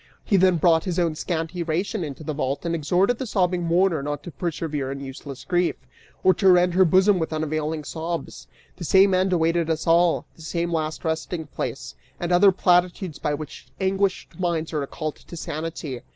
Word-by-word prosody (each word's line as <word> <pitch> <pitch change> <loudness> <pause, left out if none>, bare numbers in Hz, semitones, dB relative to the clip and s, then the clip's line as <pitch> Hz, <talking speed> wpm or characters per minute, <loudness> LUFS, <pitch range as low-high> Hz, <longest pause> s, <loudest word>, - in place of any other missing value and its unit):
He 200 - +2
then 185 -2 +4
brought 165 0 +3
his 180 -3 -2
own 170 -3 +1
scanty 165 +2 -3
ration 175 +4 -1
into 145 0 -7
the 155 - -3
vault 140 +1 -2
and 170 - -1
exhorted 180 +9 +1
the 260 - -3
sobbing 180 -4 +1
mourner 170 -1 +2
not 145 +1 -4
to 175 - -8
persevere 155 -5 -3
in 140 - -5
useless 135 0 -8
grief, 175 -1 +1 0.5
or 185 - +6
rend 180 -2 +5
her 190 +1 +5
bosom 190 +3 +4
with 160 - -2
unavailing 155 0 -2
sobs; 165 +3 -5 0.3
the 180 - -7
same 190 +3 +5
end 185 +1 +2
awaited 165 -1 +1
us 160 -1 -1
all, 170 +1 +3
the - - -16
same 170 +1 -2
last 155 0 -2
resting 160 +1 -2
place: 145 - -5 0.3
and 175 0 -2
other 190 +3 +6
platitudes 180 -2 +1
by 145 - -1
which 155 0 -9
anguished 195 0 -1
minds 170 -3 -1
are 155 - 0
recalled 150 +2 -4
to 170 - -11
sanity. 155 -5 -5
170 Hz, 185 wpm, -24 LUFS, 155-180 Hz, 0.5 s, or